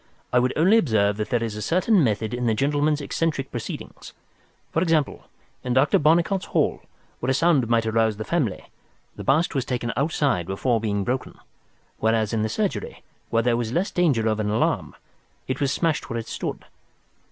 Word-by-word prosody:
I 125 - +5
would 125 +1 +1
only 190 +8 +5
observe 105 - +1
that 105 - -3
there 120 -1 +1
is 110 -2 -3
a 105 - -5
certain 185 - +3
method 110 -2 0
in 125 0 -1
the 110 - +2
gentleman's 145 +3 +1
eccentric 145 -2 -2
proceedings. 120 -3 -7 0.6
For 165 - 0
example, 160 -5 0 0.4
in 125 - -1
Dr. 135 +3 +4
Barnicot's 170 +5 +2
hall, - - 0 0.4
where 125 - -2
a 130 - +2
sound 145 -6 +3
might 115 -1 +2
arouse 110 -1 +1
the 110 - -5
family, 135 - -2 0.4
the - - -7
bust 155 +6 +2
was 135 -4 0
taken 120 -2 -3
outside 140 - 0
before 115 +4 0
being 100 -2 -1
broken, 130 +5 -3 0.6
whereas 110 -1 +1
in 110 - +1
the 110 - 0
surgery, 205 - -3 0.3
where 115 0 +1
there 120 0 +2
was 120 -1 -2
less 185 +6 0
danger 140 -11 +2
of 110 -1 0
an 105 -1 -1
alarm, 105 - 0 0.5
it 130 - -3
was 140 -1 +1
smashed 165 +2 -1
where 115 - -3
it 115 - -5
stood. - - -5
125 Hz, 185 wpm, -24 LUFS, 110-150 Hz, 0.6 s, I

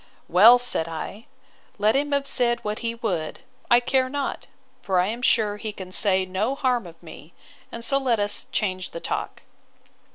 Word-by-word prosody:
—Well, 215 +8 +7
said 245 -9 +1
I, 165 +7 -7 0.5
let 210 +3 +2
him 290 +1 0
have 280 -1 0
said 240 -3 +1
what 210 0 -3
he 230 -1 -3
would, 185 -10 -4 0.3
I 240 - +6
care 255 +1 0
not: 285 0 -4 0.3
for 190 -2 0
I 180 - +3
am 225 +5 -4
sure 215 -4 +1
he 215 0 -5
can 190 -3 -10
say 190 -1 +3
no 200 +8 -2
harm 250 -7 0
of 165 0 -15
me; 160 0 -13 0.4
and 230 0 -6
so 275 +2 +1
let 250 -5 0
us 205 0 +1
change 185 -3 -2
the 170 - -7
talk. - - -5
215 Hz, 185 wpm, -24 LUFS, 185-245 Hz, 0.5 s, Well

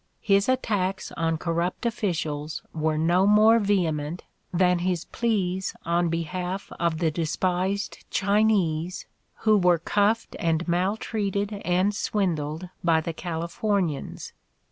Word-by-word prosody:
His 200 +2 +3
attacks 205 -7 0
on 165 -1 -1
corrupt 170 +6 -2
officials 160 -9 -2
were 155 -1 0
no 175 +5 +3
more 215 +2 +6
vehement 170 -6 0 0.3
than 180 -1 +3
his 180 -1 -1
pleas 190 -5 -1
on 170 0 +1
behalf 180 +3 -3
of 170 -2 +1
the 160 -1 +1
despised 180 +5 -1
Chinese, 195 -5 +1 0.4
who 215 -1 +4
were 180 -2 +4
cuffed 205 +7 +1
and 165 0 0
maltreated 200 +3 -1
and 185 +3 +2
swindled 175 -6 -1 0.2
by 165 -2 +4
the 165 +1 -4
Californians. 170 0 -2
180 Hz, 115 wpm, -25 LUFS, 165-200 Hz, 0.4 s, more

